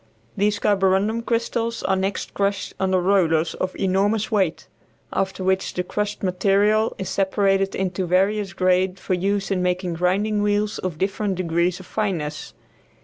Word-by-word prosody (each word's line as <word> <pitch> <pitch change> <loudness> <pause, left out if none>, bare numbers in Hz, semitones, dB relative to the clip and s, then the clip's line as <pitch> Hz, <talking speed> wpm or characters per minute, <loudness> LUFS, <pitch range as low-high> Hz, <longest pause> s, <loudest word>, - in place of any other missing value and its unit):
These 205 +1 +1
carborundum 200 +2 +2
crystals 230 0 -1
are 190 - +2
next 190 +1 -2
crushed 200 -1 -1
under 190 -1 +2
rollers 175 -4 +2
of 185 0 -3
enormous 200 +4 +1
weight, 190 -6 0 0.5
after 190 0 -1
which 190 0 0
the 180 - -1
crushed 210 +3 -3
material 200 +4 +2
is 190 - -4
separated 195 0 +1
into 185 -1 -2
various 195 +3 +1
grades 185 0 +1
for 185 - -2
use 195 +2 0
in 185 -2 +1
making 180 0 -1
grinding 195 +5 +1
wheels 205 0 0
of 180 -4 -4
different 195 +2 -1
degrees 175 0 0
of 185 - -11
fineness. 170 -9 -3
190 Hz, 145 wpm, -22 LUFS, 185-205 Hz, 0.5 s, carborundum